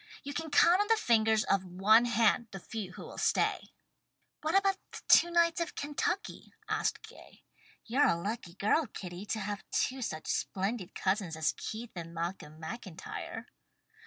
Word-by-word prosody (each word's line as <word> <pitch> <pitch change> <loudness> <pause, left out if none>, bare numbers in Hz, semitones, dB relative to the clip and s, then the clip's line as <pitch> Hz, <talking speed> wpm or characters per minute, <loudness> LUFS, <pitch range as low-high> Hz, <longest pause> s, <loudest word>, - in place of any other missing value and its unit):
You 285 0 -5
can 320 +1 -3
count 345 +6 +5
on 415 - 0
the 450 0 +4
fingers 220 - +3
of 195 -1 +1
one 195 +6 +4
hand 230 0 +3
the 195 - -7
few 200 -2 -6
who - - -9
will - - -9
stay." - - +1 0.7
"What 315 +4 0
about 390 -1 +2 0.2
the - - -7
two 345 - +7
knights 340 0 +3
of 340 - -3
Kentucky?" 295 +6 -3
asked - - -1
Gay. - - -15 0.4
"You're 260 +6 +3
a - - +3
lucky 200 -2 -4
girl, 215 +9 +2
Kitty, 185 -1 -8
to 220 - -1
have 205 0 -4
two 260 0 0
such 155 -9 -4
splendid 195 0 -2
cousins 190 -4 0
as 160 -1 +1
Keith 225 +2 -6
and 170 -1 -7
Malcolm 165 -2 -5
MacIntyre." 185 0 -7
220 Hz, 165 wpm, -31 LUFS, 185-285 Hz, 0.7 s, two